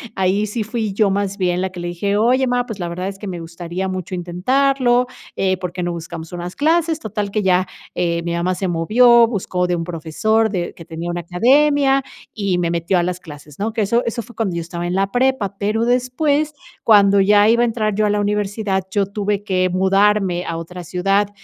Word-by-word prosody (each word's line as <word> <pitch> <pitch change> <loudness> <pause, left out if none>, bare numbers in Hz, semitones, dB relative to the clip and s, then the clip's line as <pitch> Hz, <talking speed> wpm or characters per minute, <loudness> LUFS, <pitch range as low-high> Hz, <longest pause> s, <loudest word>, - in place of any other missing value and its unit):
ahí 190 +2 +1
sí 215 +2 -3
fui 220 -2 -3
yo, 205 -1 +2
más 200 +1 -2
bien, 180 -1 +1
la 190 -1 -2
que 180 - -9
le 175 - -4
dije: 200 +4 -1
"Oye, 250 +5 +3
má, 245 -1 0
pues, 220 -4 -6
la 175 - -3
verdad 180 +2 -4
es 195 0 -6
que 205 0 -8
me 180 -2 -5
gustaría 170 +3 -5
mucho 185 -1 -5
intentarlo, 245 +8 +1 0.3
eh, 190 -1 +1
¿porque 180 0 -5
no 175 0 -2
buscamos 165 0 -7
unas 175 +1 -6
clases?". 320 +2 +1
Total 210 -3 -4
que 215 - 0
ya, 185 -1 +2 0.3
eh, 170 -1 0
mi 170 0 -2
mamá 175 +2 0
se 190 +1 -3
movió, 230 +8 +5
buscó 185 -5 -2
de 180 - 0
un 165 - -3
profesor 180 +7 0
de 180 -4 -3
que 165 - -12
tenía 165 +2 -6
una 175 0 -3
academia 275 - +3 0.3
y 195 -5 -1
me 170 - 0
metió 170 +2 +1
a - - +1
las 180 0 -2
clases, 150 -3 -12
¿no? 215 +2 -2
Que 225 - -1
eso 235 +4 +1
eso 235 +1 -2
fue 240 - -15
cuando 195 -6 -1
yo 170 - -2
estaba 170 +1 -5
en 175 - -2
la 195 +1 0
prepa, 245 -6 0
pero 215 +3 0
después, 280 +5 +1 0.4
cuando 200 -1 +6
ya 205 +1 +5
iba 235 +2 +4
a - - +4
entrar 215 -3 -1
yo 215 +1 +2
a - - +2
la 205 - +1
universidad, 205 -1 -1
yo 200 -1 +1
tuve 205 0 -2
que 185 -2 +1
mudarme 190 0 +2
a 165 - -3
otra 175 +2 -7
ciudad. 195 +4 +1
195 Hz, 220 wpm, -19 LUFS, 175-220 Hz, 0.4 s, cuando